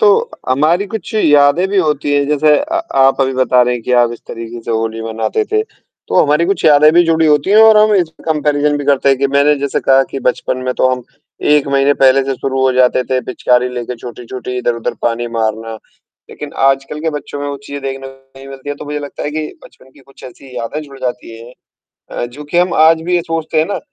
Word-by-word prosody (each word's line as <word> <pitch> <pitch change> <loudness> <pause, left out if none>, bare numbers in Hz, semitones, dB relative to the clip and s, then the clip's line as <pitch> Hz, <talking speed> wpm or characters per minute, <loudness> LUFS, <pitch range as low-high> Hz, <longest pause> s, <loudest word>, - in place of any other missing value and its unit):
तो 450 +2 +3 0.2
हमारी 155 +9 +1
कुछ 220 -2 -7
यादें 150 -2 +4
भी 205 - -2
होती 150 -4 0
हैं 145 0 +1
जैसे 150 0 +3
अ, 320 +3 -4 0.2
आप 135 0 +3
अभी 135 0 +1
बता 130 -1 +2
रहे 125 0 0
हैं 120 - -6
कि 125 - -3
आप 120 -1 +3
इस 120 - -9
तरीक़े 115 +1 -7
से - - -6
होली 115 0 -2
मनाते 115 - -2
थे। 430 0 +2 0.5
तो - - +3
हमारी 150 +2 +2
कुछ 195 - -2
यादें 150 0 +6
भी 175 +1 +5
जुड़ी 165 -1 +2
होती 150 +3 +2
हैं 210 - +4
और 220 -1 +7
हम 210 0 +4
इसमें 170 -4 -2
कंपैरिज़न 150 -1 0
भी 145 - -5
करते 140 -1 +2
हैं 135 -1 +3
कि 140 - +2
मैंने 140 +2 +3
जैसे 140 0 -2
कहा 135 0 +4
कि 135 - -4
बचपन 130 - -1
में 125 - -1
तो 130 - +2
हम 125 -1 -3 0.5
1 150 -1 +3
महीने 140 +1 +2
पहले 135 0 +4
से 135 -1 -2
शुरू 135 +1 -3
हो 130 - +3
जाते 125 0 +3
थे, 130 +1 -1
पिचकारी 125 0 0
लेके 125 0 -5
छोटी-छोटी, 125 +1 -8
इधर-उधर 120 -2 -2
पानी 120 0 -1
मारना। 115 -1 -3 0.6
लेक़िन 150 -1 -8 0.2
आजकल 135 +2 -2
के 160 +1 -1
बच्चों 145 -1 -6
में 145 - -3
वो 140 - -4
चीज़ 145 0 -6
देखने 135 0 -5
को 135 - -12
में 135 - -25
नहीं 135 0 -12
मिलती 135 +1 -10
है, 145 - -2
तो - - -9
मुझे 150 0 -4
लगता 145 -1 -8
है 145 - -3
कि 155 0 -3 0.2
बचपन 130 - -18
की 140 - -21
कुछ 135 +1 -18
ऐसी 130 0 -12
यादें 120 +6 -4
जुड़ 140 -2 -13
जाती 125 -2 -5
हैं। 120 +2 -12 0.6
अ, - - -4
जो 135 +5 -11
कि 160 +4 -1
हम 180 +1 +1
आज 160 +1 +4
भी 180 +2 -1
ये 175 - +2
सोचते 165 -1 -3
हैं 155 - +2
ना, 205 - -3
140 Hz, 240 wpm, -15 LUFS, 125-155 Hz, 0.6 s, और